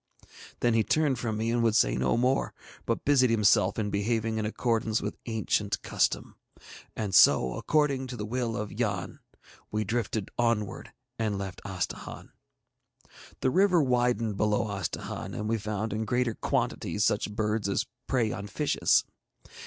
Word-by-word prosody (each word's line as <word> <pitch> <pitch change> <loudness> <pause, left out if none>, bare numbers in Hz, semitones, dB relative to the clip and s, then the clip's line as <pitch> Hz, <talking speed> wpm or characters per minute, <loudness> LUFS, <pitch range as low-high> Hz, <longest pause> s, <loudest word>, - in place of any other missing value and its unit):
Then 120 -1 +3
he 115 -1 +3
turned 145 -3 +1
from 110 -4 -2
me 115 +1 -1
and 120 0 +1
would 115 -2 +2
say - - +3
no 65 - +1
more, 130 +3 +1 0.3
but - - -1
busied 135 -3 +4
himself 105 -4 +3
in 105 -2 -1
behaving 110 +2 0
in 105 - -1
accordance 115 0 0
with - - -5
ancient 105 -2 0
custom. - - 0 0.6
And 105 -3 -3
so, 65 -7 +6
according 140 - +1
to 125 -1 -6
the 105 - -4
will 120 0 -2
of 105 0 -4
Yann, 100 -5 -3 0.5
we 105 0 -1
drifted 110 -1 -2
onwards 115 -4 0 0.3
and 110 -3 0
left 95 -1 -6
Astahahn. 95 -4 -5 1.1
The 130 - +2
river 180 -2 +4
widened 120 -4 +1
below 105 +1 +1
Astahahn, 95 -4 -4
and 105 - -3
we 115 0 0
found 105 +1 -3
in 110 +1 -2
greater 125 0 0
quantities 105 - -1
such 105 0 +1
birds 105 -1 0
as 100 - 0 0.2
prey 120 -5 +1
on 100 - -5
fishes. 145 +8 +2
110 Hz, 155 wpm, -28 LUFS, 105-120 Hz, 1.1 s, so